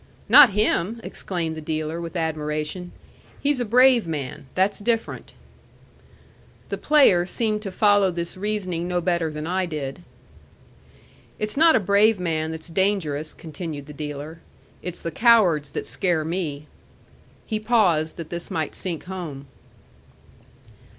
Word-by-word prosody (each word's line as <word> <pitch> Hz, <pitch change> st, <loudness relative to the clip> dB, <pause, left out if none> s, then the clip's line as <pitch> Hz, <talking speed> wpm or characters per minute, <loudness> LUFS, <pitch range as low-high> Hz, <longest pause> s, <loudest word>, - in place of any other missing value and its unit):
"Not 270 Hz, -8 st, +8 dB
him!" 210 Hz, +1 st, +1 dB
exclaimed 170 Hz, -4 st, -4 dB
the 160 Hz, -, -7 dB
dealer 155 Hz, +2 st, -3 dB
with 170 Hz, +1 st, -7 dB
admiration. 155 Hz, +2 st, -3 dB, 0.5 s
"He's 285 Hz, -2 st, 0 dB
a 245 Hz, -, -1 dB
brave 245 Hz, -2 st, +5 dB
man. 140 Hz, -4 st, -5 dB
That's 190 Hz, +2 st, +1 dB
different." 225 Hz, +2 st, -2 dB, 1.4 s
The -, -, -4 dB
player 275 Hz, -13 st, +5 dB
seemed 215 Hz, 0 st, -1 dB
to 200 Hz, -3 st, -5 dB
follow 205 Hz, -1 st, +4 dB
this 170 Hz, -1 st, -4 dB
reasoning 185 Hz, -4 st, -3 dB
no 180 Hz, 0 st, 0 dB
better 170 Hz, -2 st, 0 dB
than 150 Hz, 0 st, -5 dB
I 185 Hz, +2 st, -1 dB
did. 150 Hz, -1 st, -5 dB, 1.4 s
"It's 215 Hz, 0 st, -2 dB
not 320 Hz, +1 st, +6 dB
a -, -, +4 dB
brave 205 Hz, +1 st, +3 dB
man 160 Hz, -3 st, -1 dB
that's 160 Hz, +1 st, -6 dB
dangerous," 165 Hz, -5 st, -1 dB
continued 155 Hz, -2 st, -7 dB
the 150 Hz, -, -10 dB
dealer. 150 Hz, +2 st, -7 dB, 0.4 s
"It's 180 Hz, -1 st, -6 dB
the 165 Hz, -, -3 dB
cowards 180 Hz, -, +4 dB
that -, -, -3 dB
scare 170 Hz, -4 st, 0 dB
me." 160 Hz, -4 st, -3 dB, 0.8 s
He 215 Hz, -2 st, -2 dB
paused 190 Hz, -9 st, +2 dB
that 165 Hz, -2 st, -8 dB
this 170 Hz, 0 st, -5 dB
might 160 Hz, -2 st, -2 dB
sink 175 Hz, -4 st, -4 dB
home. 170 Hz, -7 st, -7 dB
175 Hz, 135 wpm, -23 LUFS, 155-205 Hz, 1.4 s, Not